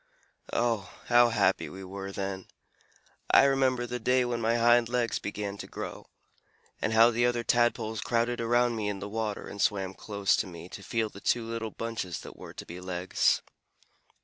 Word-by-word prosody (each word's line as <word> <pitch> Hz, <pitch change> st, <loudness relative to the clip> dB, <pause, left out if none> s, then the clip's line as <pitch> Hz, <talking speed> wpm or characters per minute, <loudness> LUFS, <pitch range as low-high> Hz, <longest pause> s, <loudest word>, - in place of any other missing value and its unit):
"Oh, 115 Hz, -5 st, 0 dB, 0.2 s
how 120 Hz, 0 st, +6 dB
happy 95 Hz, -4 st, +2 dB
we 95 Hz, +1 st, -9 dB
were 95 Hz, +1 st, -6 dB
then! 95 Hz, -1 st, -4 dB, 0.8 s
I -, -, +7 dB
remember 135 Hz, -3 st, +2 dB
the 125 Hz, 0 st, -4 dB
day 125 Hz, +2 st, +2 dB
when 120 Hz, -1 st, -2 dB
my 115 Hz, +1 st, +2 dB
hind 120 Hz, 0 st, +4 dB
legs 120 Hz, -2 st, 0 dB
began 100 Hz, 0 st, -4 dB
to -, -, -6 dB
grow, -, -, -7 dB, 0.7 s
and -, -, 0 dB
how 115 Hz, +2 st, +7 dB
the 120 Hz, +1 st, +2 dB
other 120 Hz, -1 st, 0 dB
Tadpoles 115 Hz, -2 st, +1 dB
crowded 120 Hz, 0 st, 0 dB
around 120 Hz, +1 st, +2 dB
me 105 Hz, -2 st, -1 dB
in 100 Hz, -, -3 dB
the 100 Hz, -, -6 dB
water 110 Hz, 0 st, -3 dB
and 100 Hz, -, -6 dB
swam 95 Hz, -3 st, +1 dB
close 100 Hz, -1 st, 0 dB
to 105 Hz, -, -1 dB
me 85 Hz, -1 st, -10 dB
to -, -, -9 dB
feel 115 Hz, -2 st, -1 dB
the 100 Hz, -, -12 dB
two 120 Hz, -2 st, +1 dB
little 115 Hz, -1 st, -4 dB
bunches 110 Hz, -7 st, -4 dB
that -, -, -10 dB
were -, -, -11 dB
to -, -, -7 dB
be 90 Hz, +2 st, -8 dB
legs. 90 Hz, 0 st, +1 dB
115 Hz, 185 wpm, -29 LUFS, 100-120 Hz, 0.8 s, I